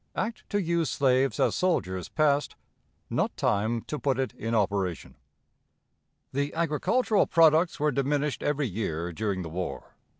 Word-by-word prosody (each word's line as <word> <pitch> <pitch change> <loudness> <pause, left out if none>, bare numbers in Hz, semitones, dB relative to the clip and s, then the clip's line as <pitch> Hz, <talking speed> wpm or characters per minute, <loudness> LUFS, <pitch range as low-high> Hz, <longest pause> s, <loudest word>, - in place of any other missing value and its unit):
Act 225 +1 -4
to 205 - 0
use 170 -4 0
Slaves 135 0 +2
as - - +3
Soldiers 95 - -1
passed. 145 -2 +1 0.5
Not - - -1
Time 110 +3 +1
to 150 - -5
put 135 -3 0
it 130 -5 -2
in 115 +1 -3
Operation. 100 -4 -1 1.2
The 140 +2 -1
agricultural 170 - +1
products 165 +1 +4
were 150 0 +2
diminished 140 0 0
every 145 0 0
year 85 -5 -3
during 100 -1 -2
the 80 - -6
war. 80 -6 -5
135 Hz, 140 wpm, -27 LUFS, 100-155 Hz, 1.2 s, products